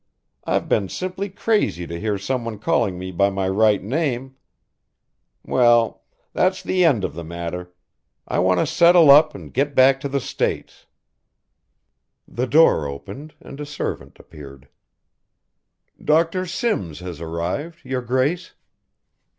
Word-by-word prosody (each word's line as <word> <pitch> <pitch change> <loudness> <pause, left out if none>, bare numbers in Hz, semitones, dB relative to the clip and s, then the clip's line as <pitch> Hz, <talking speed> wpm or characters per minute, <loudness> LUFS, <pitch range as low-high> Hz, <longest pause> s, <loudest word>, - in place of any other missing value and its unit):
I've - - -1
been 100 -3 0
simply 185 +2 -4
crazy 195 - -1
to 85 0 -6
hear 105 0 -1
someone 115 +2 -3
calling 105 - 0
me 95 +1 -6
by 100 +3 +2
my 95 -1 -2
right 105 +1 +2
name 130 +1 -2 1.1
well, 120 -2 +3 0.3
that's 185 +1 +1
the 185 -1 +1
end 135 - +3
of - - -3
the 85 +2 -7
matter, 85 +2 -6 0.6
I - - -1
want 90 +1 +2
to - - +1
settle 170 0 +6
up 150 +2 +6
and - - -11
get 140 +2 -1
back 130 +1 +5
to 140 - -4
the 140 0 -1
States - - -4 0.7
" - - -54 0.7
The 125 +2 -3
door 145 - +4
opened 100 - -9
and 140 - -12
a 150 - -5
servant 145 - -5
appeared. 70 -3 -13 1.3
"Dr. 165 +4 +1
Simms 100 - -2
has 90 -3 -8
arrived, 85 - -4
your 130 -1 -2
grace." 130 +8 -1
125 Hz, 140 wpm, -21 LUFS, -, 1.3 s, settle